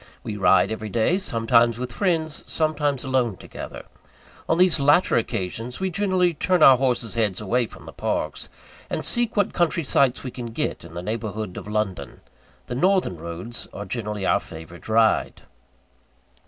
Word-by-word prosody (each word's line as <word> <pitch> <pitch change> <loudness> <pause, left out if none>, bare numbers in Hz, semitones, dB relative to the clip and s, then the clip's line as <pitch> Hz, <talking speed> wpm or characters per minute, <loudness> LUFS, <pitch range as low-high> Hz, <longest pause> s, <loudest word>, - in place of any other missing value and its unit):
We 105 - -4
ride 100 +1 +4
every 110 -1 -4
day 120 - +1
sometimes 115 - +2
with 125 0 -5
friends, 160 0 -1
sometimes 150 -4 0
alone 130 -7 0
together. - - -9 0.6
On 165 - +3
these 180 -3 +4
latter 145 +6 +4
occasions, 115 +1 -2
we 190 0 -1
generally 185 -1 +2
turn 180 +1 +2
our 135 -2 +9
horses' 125 -3 0
heads 110 -5 0
away 115 +3 0
from - - -14
the - - -10
parks, - - -3 0.4
and - - -2
seek 240 -2 +1
what 205 - +2
country 170 -1 +1
sights 135 -2 +2
we 130 - -5
can 120 -1 -6
get - - -2
in 80 - -12
the 85 - -5
neighbourhood 110 -2 -4
of - - -7
London. 100 -10 -3 0.4
The - - -6
northern 180 - +2
roads 85 +8 -6
are 100 - -6
generally 105 -1 -4
our - - +3
favourite 80 +5 -11
ride. 110 0 +2
120 Hz, 165 wpm, -24 LUFS, 105-160 Hz, 0.6 s, our